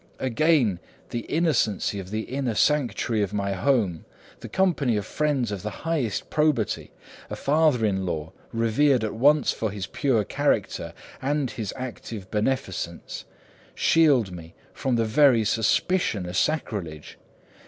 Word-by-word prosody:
Again, 130 - +2 0.3
the 120 -1 -4
innocency 125 - +1
of 95 -1 -8
the 110 +2 -2
inner 130 -1 -3
sanctuary 120 -6 +1
of 100 0 -2
my 100 -1 -1
home, 95 - +1 0.3
the - - -9
company 155 - +1
of 100 - -3
friends 145 -7 0
of 100 -3 -4
the 105 - -3 0.2
highest 145 -11 -1
probity, 150 -8 +1 0.4
a - - -4
father 145 -5 +2
in 95 -2 0
law 80 -4 -3 0.2
revered 115 +3 +2
at 110 - -2
once 145 +6 +4
for 110 - -2
his 100 -1 -5
pure 120 -2 +1
character - - -1 0.3
and 140 -1 0
his 110 -4 -4
active 115 -6 -7
beneficence, 105 -7 -2 0.5
shield 140 - +4
me 85 -2 -10 0.2
from 130 -2 -1
the 115 -1 +1
very 120 0 +4
suspicion 110 - +1
of 90 - -6
sacrilege. 95 - -2
115 Hz, 140 wpm, -25 LUFS, 100-140 Hz, 0.5 s, once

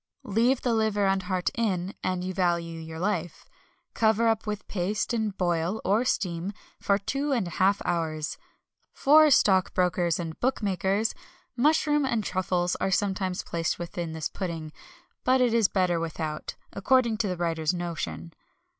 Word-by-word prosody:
Leave 235 +5 +2
the 245 - +1
liver 215 -2 +1
and 195 0 +2
heart 185 -2 -1
in, 195 -5 -1
an 185 -1 -1
you 185 +1 -3
value 170 -3 0
your 160 0 -8
life. 175 -3 -2 0.5
Cover 220 +1 +3
up 225 -1 0
with 210 -1 -4
paste, 205 +5 -1
and 220 -4 -1
boil 175 +2 0
(or 210 +5 +3
steam) 180 -4 -1 0.3
for 200 0 +2
two 275 +8 -2
and 240 -7 +1
a 175 - -6
half 195 +2 +4
hours. 160 -3 -2 0.5
For 305 +2 +6
stockbrokers 180 - +3
and 165 -2 -5
bookmakers, 205 -3 0 0.4
mushrooms 295 +1 +3
and 230 -3 0
truffles 180 -2 0
are - - 0
sometimes 190 -1 -1
placed 165 -1 -2
within 170 -1 -5
this 160 -1 -2
pudding; 165 -5 -5 0.5
but 255 +1 +3
it 245 -2 +3
is 230 -4 +4
better 180 -3 +1
without 160 -2 -4 0.2
according 235 +2 +2
to 210 - 0
the 180 -2 -2
writer's 165 -2 0
notion. 160 - -5
190 Hz, 155 wpm, -27 LUFS, 170-220 Hz, 0.5 s, For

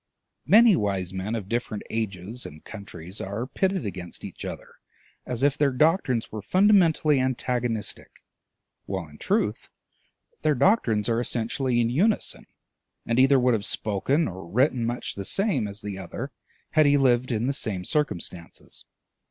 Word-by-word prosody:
Many 215 +4 +7
wise 95 -3 -1
men 95 +4 -3
of 105 -4 -4
different 115 -2 -3
ages 110 +1 -3
and 75 +1 -10
countries 100 -3 -8
are 100 +5 -3
pitted 190 - -1
against 90 -3 -7
each - - -8
other - - -8 0.5
as 125 0 -3
if 140 -1 +4
their 145 -1 +3
doctrines 135 - +1
were 110 - -5
fundamentally 170 - +4
antagonistic, 125 -3 -2 0.6
while, 95 -4 -3
in 75 0 -16
truth, - - -1 0.7
their 155 -1 +2
doctrines 120 - +3
are 115 0 +1
essentially 120 +1 0
in 115 0 +2
unison, 200 - +1 0.6
and 115 +2 +1
either 135 +1 +6
would 125 0 +3
have 110 -3 0
spoken 120 +10 0
or 95 -1 -8
written 125 - +2
much 120 +1 -3
the 100 - -5
same 155 - +1
as 100 +1 -8
the 100 -2 -5
other 120 +9 -6 0.4
had 155 -2 +5
he 145 0 +5
lived 130 -2 +3
in 115 0 0
the 135 - +1
same 100 -9 -2
circumstances. 90 - -3
120 Hz, 150 wpm, -26 LUFS, 100-140 Hz, 0.7 s, Many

